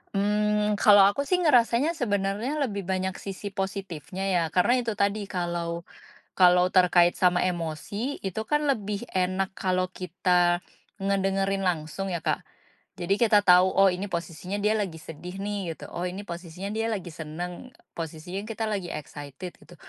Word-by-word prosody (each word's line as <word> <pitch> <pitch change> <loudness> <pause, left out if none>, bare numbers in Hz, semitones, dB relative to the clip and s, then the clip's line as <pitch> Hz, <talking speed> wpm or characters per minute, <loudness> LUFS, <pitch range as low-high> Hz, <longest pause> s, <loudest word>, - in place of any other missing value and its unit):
Mmm, 210 +1 +1
kalau 205 -2 +8
aku 240 +9 +2
sih 365 - +3
ngerasanya 250 +1 +4
sebenarnya 210 - -1
lebih 200 -7 -3
banyak 190 0 -1
sisi 200 +1 -6
positifnya 190 -3 -4
ya, 180 -2 +3
karena 240 +8 +4
itu 230 -3 -2
tadi, 200 +1 0
kalau 170 -2 -3 0.5
kalau 180 0 +6
terkait 175 -1 +5
sama 180 -1 +3
emosi 180 - -3
itu 195 +2 -3
kan 295 +5 +1
lebih 210 -4 -1
enak 185 +1 0
kalau 185 -1 0
kita 180 -1 +1 0.4
ngedengerin 195 0 0
langsung 175 +2 -2
ya, 170 - -2
Kak. - - -1 0.5
Jadi 185 +3 +1
kita 215 -3 +5
tahu, 180 +1 +6
"Oh, 195 0 +6
ini 185 +2 -2
posisinya 170 +3 -4
dia 210 +1 +3
lagi 190 -6 -3
sedih 165 +4 -8
nih," 200 -4 -3
gitu, - - -10
"Oh, 175 - -3
ini 180 +2 -4
posisinya 175 +2 -6
dia 225 +1 -1
lagi 190 -5 -4
senang, 175 +10 -7 0.2
posisinya 165 +4 -5
kita 225 0 -3
lagi 195 -5 -3
excited." 145 +3 -8
gitu. 175 - -16
190 Hz, 155 wpm, -26 LUFS, 175-205 Hz, 0.5 s, kalau